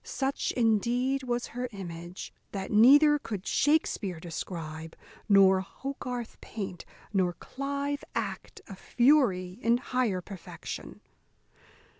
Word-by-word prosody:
Such 270 0 -2
indeed 245 +4 +2
was 245 -1 -2
her 250 +1 -3
image, 175 -3 -8 0.2
that 195 -1 -4
neither 290 +7 +7
could 205 -8 -6
Shakspear 230 - +1
describe, 160 -1 -6 0.3
nor 195 -1 +6
Hogarth 250 +2 -6
paint, 190 -5 -6 0.3
nor 185 -3 +2
Clive 280 +5 -4
act, 430 - -4
a 195 - -8
fury 230 -7 +2
in 235 0 +3
higher 245 -6 0
perfection. 185 0 -8
225 Hz, 105 wpm, -29 LUFS, 185-265 Hz, 0.3 s, neither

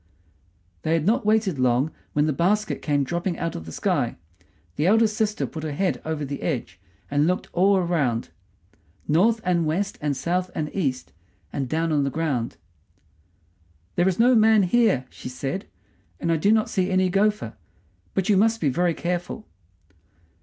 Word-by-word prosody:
They 160 - 0
had 165 -2 +1
not 225 +2 +2
waited 215 -8 +2
long 130 +4 +2 0.2
when 150 0 +2
the 155 - +1
basket 205 +8 0
came 145 -2 +1
dropping 170 +5 -2
down - - -5
out 165 - -2
of 80 - -7
the - - -7
sky. - - 0 0.6
The 155 - +1
eldest 220 +1 +4
sister 215 -1 0
put 160 - -7
her 155 -1 -4
head 185 +5 -1
over 155 -2 -3
the 140 +1 -5
edge, 135 - -3 0.3
and 145 +2 +2
looked 180 +1 -1
all 195 +3 +4
around, 150 -10 0 0.8
north 215 +9 +3
and 175 -2 +1
west 180 +6 -1
and 145 -2 -1
south 180 +4 -1
and 150 -1 -3
east 135 -9 -2 0.4
and 135 -3 -2
down 165 +2 0
on 145 -2 +2
the 140 - 0
ground. 140 -6 -2 1.4
"There 175 +1 +3
is 185 - -2
no 245 +3 +5
man 220 -2 +5
here," 190 - +2
she - - -8
said, 135 +8 -4 0.5
"and 165 - 0
I - - +3
do 200 +7 +3
not 220 -1 +3
see 185 -1 0
any 185 -1 +2
gopher; 205 - +1 0.6
but 190 - 0
you 205 - +4
must 225 +3 +3
be 150 - +1
very 170 +4 +1
careful." 175 +5 -3
170 Hz, 175 wpm, -24 LUFS, 145-200 Hz, 1.4 s, no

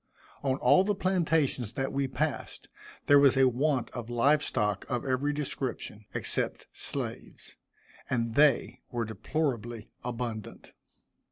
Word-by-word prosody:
On 135 -1 0
all 185 - +5
the 205 +1 0
plantations 160 - +1
that 135 0 -2
we 135 0 0
passed, 135 +3 -3 0.4
there 145 0 +7
was 140 -2 +5
a 135 -1 +6
want 130 +1 0
of 120 -2 -6
live 140 +5 +3
stock 105 -8 0
of 120 +1 -2
every 135 +2 +1
description, 130 -7 -4
except - - -1
slaves, - - -6 0.5
and 115 -2 0
they 145 -1 +3
were 120 -1 -1
deplorably 120 0 -3
abundant. 120 -3 -5
130 Hz, 125 wpm, -29 LUFS, 120-145 Hz, 0.5 s, there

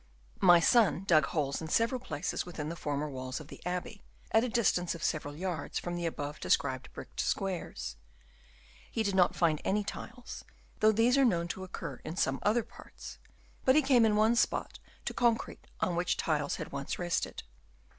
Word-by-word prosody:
My 175 -2 +7
son 200 -1 +4
dug 155 -7 +4
holes 145 -3 -1
in 160 - -5
several 230 - +1
places 180 - -3
within 155 -4 -5
the 170 - -4
former 145 -2 -2
walls 130 -2 -5
of 155 -1 -11
the - - -11
abbey, 180 +3 -4 0.3
at 220 +1 +4
a 250 - -1
distance 180 -7 +1
of 170 - -8
several 145 -2 -1
yards 180 +1 -3
from 175 0 -3
the 170 -1 -1
above 145 -2 -5
described 130 -2 0
bricked - - -10
squares. 180 - -2 0.9
He 225 - -1
did 200 -2 0
not 185 -2 +4
find 160 -3 +2
any 210 +2 +1
tiles, 245 +4 -7 0.4
though 215 0 +6
these 235 +5 +3
are - - +6
known 170 -9 +2
to 190 - -4
occur 185 - -6
in 155 - -5
some 135 -7 +1
other 220 +3 +2
parts, - - -12 0.4
but 260 - +5
he 305 - +5
came 260 -3 +5
in 215 -2 +4
one 220 +2 +4
spot - - 0 0.3
to - - -2
con 235 -1 +4
crete - - -10
on 175 - +1
which 175 +1 0
tiles 150 -3 0
had - - -6
once 140 0 -4
rested. 175 -1 -2
180 Hz, 190 wpm, -31 LUFS, 155-220 Hz, 0.9 s, My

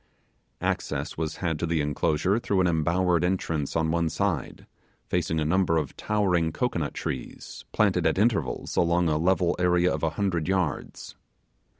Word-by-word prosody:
Access - - -2
was 80 0 -3
had 80 -4 -2
to 85 - -1
the 80 -1 0
enclosure 75 +7 +1
through 100 -5 +1
an - - +2
embowered 85 +1 +2
entrance, 85 -5 -1
on 80 0 +1
one 85 0 +1
side, - - -2 0.4
facing 85 -2 -1
a 75 - 0
number 85 0 +2
of 75 -4 -2
towering 90 -6 +1
cocoanut 85 -7 -2
trees, - - -6
planted - - +2
at - - 0
intervals 105 +1 0
along 85 0 +2
a 75 - +1
level 90 0 +2
area 90 0 +3
of 80 - -3
a 80 - +1
hundred 95 -6 0
yards. 95 -5 -2
85 Hz, 160 wpm, -26 LUFS, 80-95 Hz, 0.4 s, area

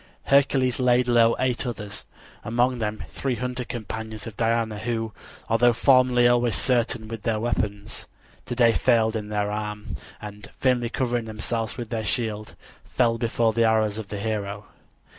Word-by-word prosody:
Hercules 135 -2 +3
laid 125 -1 +3
low 115 -1 +4
eight 125 -2 0
others, 105 -4 -6 0.4
among 120 +2 +1
them 110 -1 -3
three 135 -3 -2
hunter 125 +1 -3
companions 110 -2 -6
of 115 -3 -8
Diana, 115 -2 0
who, 115 -1 -2 0.3
although 120 +2 +4
formerly 125 0 +4
always 120 -1 +3
certain 120 -3 0
with 115 0 -6
their 110 -1 0
weapons, 105 -3 -2 0.4
today 120 -1 +4
failed 115 -2 +2
in 105 -1 -4
their 105 -1 -1
aim, 105 -2 -4 0.2
and 105 -1 -9
vainly 125 -3 +2
covering 120 -2 -1
themselves 110 0 -3
with 120 -3 -6
their 115 -2 -2
shields 110 0 -2 0.3
fell 115 -2 +1
before 115 -1 +1
the 115 +1 +2
arrows 110 -1 +2
of 110 - -6
the 105 - -5
hero. 105 -1 -3
115 Hz, 155 wpm, -25 LUFS, 110-120 Hz, 0.4 s, low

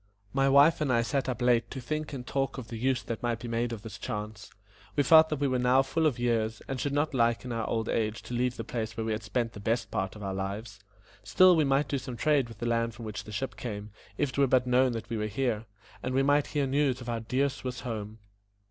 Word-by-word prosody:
My 135 0 +3
wife 145 +4 +6
and 145 -4 +1
I 115 -2 +3
sat 130 +3 -1
up 125 0 -2
late 120 -2 +3
to 135 - -6
think 155 +5 -3
and 130 -3 -6
talk 135 0 -1
of 120 -4 -7
the 115 - -5
use 130 +2 0
that 115 - -5
might 120 -1 0
be 120 +1 -8
made 115 +1 -1
of 110 -2 -6
this 110 -3 -8
chance. 105 -2 -5 0.5
We 145 - +3
felt 160 +3 +7
that 150 - -2
we 145 - +2
were 130 -1 0
now 125 +2 +4
full 160 +4 +1
of 140 - 0
years, 115 -2 0
and 135 -1 -3
should 145 - -1
not 145 +2 0
like 120 -1 +2
in 125 - -5
our 115 -1 -2
old 110 -1 -1
age 110 0 -1
to - - -8
leave 125 0 0
the 115 - -4
place 115 -1 -4
where 110 - -2
we 110 - -1
had 110 0 -2
spent 115 +3 -2
the - - -9
best 110 +4 -1
part 95 +1 -2
of 105 - -9
our 95 -1 -3
lives; 100 +2 -5 0.4
still 180 - +6
we 155 -2 +3
might 135 +1 +2
do 140 - -1
some 125 -1 -7
trade 145 -3 +2
with 115 - -11
the 120 - -4
land 115 -1 0
from 115 0 -8
which 105 -1 -6
the 105 - -9
ship 130 +6 -3
came, 105 -3 -6 0.3
if 145 - +1
it 140 - -4
were 140 - +5
but 130 0 +3
known 125 0 +3
that 115 - -5
we 115 - -3
were 105 0 -1
here, 115 0 -1 0.4
and 130 0 -2
we 135 - +3
might 145 +1 +3
hear 145 -2 0
news 135 -1 +1
of 120 - -9
our 115 -1 -1
dear 130 +5 +1
Swiss 130 -3 -5
home. 110 -3 -5
120 Hz, 275 wpm, -29 LUFS, 110-135 Hz, 0.5 s, felt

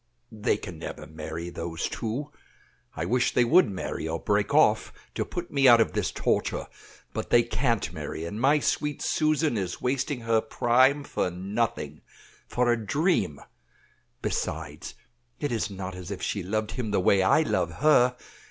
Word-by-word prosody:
"They 105 -1 0
can 90 -6 -8
never 80 - -7
marry, 80 +2 -6
those 85 -1 -3
two. 130 +6 -4 0.6
I 80 - -2
wish 120 +6 +1
they 125 - +5
would 170 - +5
marry 95 -4 -4
or 80 +1 -2
break 105 0 0
off, - - +4 0.2
to - - -1
put 175 -1 -6
me 135 -1 +4
out 120 -2 +8
of 115 - +2
this - - 0
torture; - - -1 0.5
but - - -4
they 120 - +5
can't 120 -2 -1
marry, 80 - -5
and 105 +6 -5
my 140 +4 +5
sweet 150 0 -1
Susan 155 -2 +1
is 95 -3 -3
wasting 130 +1 -1
her 115 -1 +2
prime 130 +5 +3
for 115 - -1
nothing, 90 -4 -3 0.5
for 125 -1 +1
a 115 -2 0
dream. 125 - 0 0.8
Besides, - - -4 0.4
it 145 - -2
is 115 -2 -1
not 95 -1 -6
as 90 -1 -8
if 100 - -5
she 100 - -1
loved 110 +4 -2
him 120 -4 -3
the 100 - +1
way 95 +1 +4
I 95 +11 +4
love 90 - 0
her. 125 - +4
110 Hz, 170 wpm, -27 LUFS, 90-130 Hz, 0.8 s, out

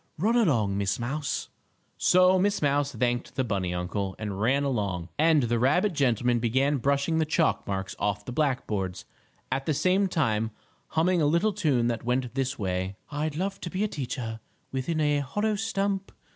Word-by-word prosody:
Run 215 +9 +2
along, 115 - +2
Miss 100 0 0
Mouse." 135 +5 -3 0.5
So 185 +1 +5
Miss 200 +2 +2
Mouse 145 -1 +1
thanked 120 0 -1
the 130 - +1
bunny 95 -6 -1
uncle, 95 +2 -3
and 105 -2 -4
ran 135 +5 +2
along, 100 -10 -2
and 155 -2 +4
the 120 0 +1
rabbit 170 - +3
gentleman 125 -4 +2
began 130 +5 +2
brushing 140 +5 +1
the - - +3
chalk 160 +1 +1
marks 95 -1 -3
off 105 0 -1
the - - -5
black 140 -1 0
boards, 95 -3 -3 0.5
at 135 +1 -2
the 155 - +1
same 185 +6 +2
time 115 - 0 0.4
humming 170 +2 +2
a 150 - +3
little 170 +8 +2
tune 135 -10 +1
that 120 -1 -1
went 125 0 -1
this 135 0 -1
way: 95 -1 -2 0.2
"I'd 150 0 -2
love 195 +4 -3
to 175 - -4
be 185 +4 -1
a - - +2
teacher, 125 - -4 0.3
Within 135 +5 -2
a 150 -1 +2
hollow 205 +11 -1
stump. 200 -2 -1
135 Hz, 180 wpm, -27 LUFS, 110-160 Hz, 0.5 s, So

